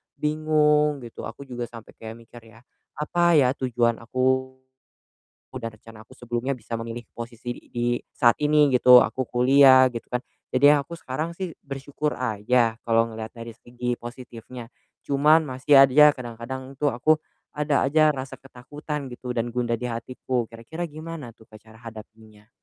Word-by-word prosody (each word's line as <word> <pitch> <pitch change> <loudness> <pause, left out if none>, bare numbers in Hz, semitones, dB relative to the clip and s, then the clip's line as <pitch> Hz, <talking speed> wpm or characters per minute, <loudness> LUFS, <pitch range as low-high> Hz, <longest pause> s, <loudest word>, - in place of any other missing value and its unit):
bingung 150 -2 +1
gitu, 115 - -8
aku 115 +5 -10
juga 120 -2 -5
sampai 115 -2 -12
kayak 110 0 -8
mikir 120 +1 -15
ya, 115 - -19 0.4
apa 170 +2 +2
ya 130 -4 +4
tujuan 120 -3 0
aku, 130 +2 -1 1.0
udah 120 -3 -4
rencana 110 0 -14
aku - - -28
sebelumnya 120 +2 -3
bisa 115 -1 -7
memilih 115 +1 -6
posisi 120 +1 -7
di - - -14
di 120 0 -1 0.3
saat 120 -1 +4
ini 150 -1 +4
gitu, 125 0 +8
aku 130 - -3
kuliah, 130 +1 +6
gitu 115 -1 -7
kan. 125 0 -1 0.3
Jadi, 145 +3 +6
aku 145 +3 -4
sekarang 155 +5 -4
sih 185 -4 -5
bersyukur 140 +2 -4
aja 115 0 +1
kalau 115 0 +3
ngelihat 110 0 -7
dari 115 0 -9
segi 120 +1 -4
positifnya, 120 -1 -10 0.4
cuman 150 +3 +4
masih 130 +2 +4
aja 150 +3 +7
kadang-kadang 125 +2 -8
tuh 145 -1 +2
aku 155 +7 +3 0.4
ada 150 -1 +1
aja 155 +1 +4
rasa 130 -1 -7
ketakutan 140 +3 -7
gitu 125 0 -7
dan 115 +1 -1
gundah 120 -1 0
dihatiku. 125 0 -3
Kira-kira 115 +10 -7
gimana 155 -4 -8
tuh 110 - -20
Kak, 110 -1 -16
cara 110 0 -18
hadapinnya? 110 -1 -14
125 Hz, 155 wpm, -24 LUFS, 115-145 Hz, 1.0 s, gitu